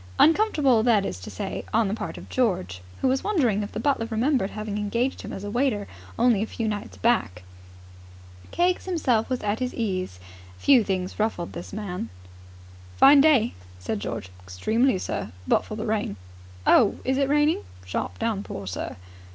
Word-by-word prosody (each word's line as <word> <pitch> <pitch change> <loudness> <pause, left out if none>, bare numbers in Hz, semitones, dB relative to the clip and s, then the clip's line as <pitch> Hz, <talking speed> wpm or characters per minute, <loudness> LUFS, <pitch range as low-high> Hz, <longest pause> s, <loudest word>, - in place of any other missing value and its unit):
Uncomfortable, 300 - +4
that 220 -4 +3
is 90 - -4
to 90 - -8
say, 95 - -5
on 225 -1 +3
the 195 - -1
part 225 - -5
of - - -10
George, 175 - -1 0.2
who - - +3
was 265 +1 +1
wondering 255 - +2
if 205 - -5
the - - -4
butler 230 -2 +1
remembered 240 -1 +1
having 210 -1 -4
engaged 235 +6 -1
him - - -7
as 195 - -6
a 205 - -4
waiter 240 -4 0 0.3
only 235 -5 +3
a 220 - -1
few 225 0 -3
nights 210 -1 -4
back. 160 - +1 1.1
Keggs 355 +1 +1
himself 265 -12 +1
was 255 -1 -1
at 210 +1 -1
his 255 -1 -2
ease. 185 - -2 0.4
Few 265 -5 +5
things 190 -1 -3
ruffled 210 -6 -1
this 175 - -7
man. 185 - -4 0.9
"Fine 280 0 +8
day," 275 -7 +4 0.2
said 90 +4 -3
George. 95 - -5
"Extremely, 215 - +1
sir, - - -4 0.2
but - - +3
for 215 - -6
the 215 - -4
rain." 215 - -1 0.5
"Oh, 220 - +5
is 265 +1 +1
it 275 -1 +2
raining?" 295 +2 +3 0.2
"Sharp 90 0 -3
downpour, 200 - -3
sir." 90 -2 -4
220 Hz, 175 wpm, -25 LUFS, 195-260 Hz, 1.1 s, Fine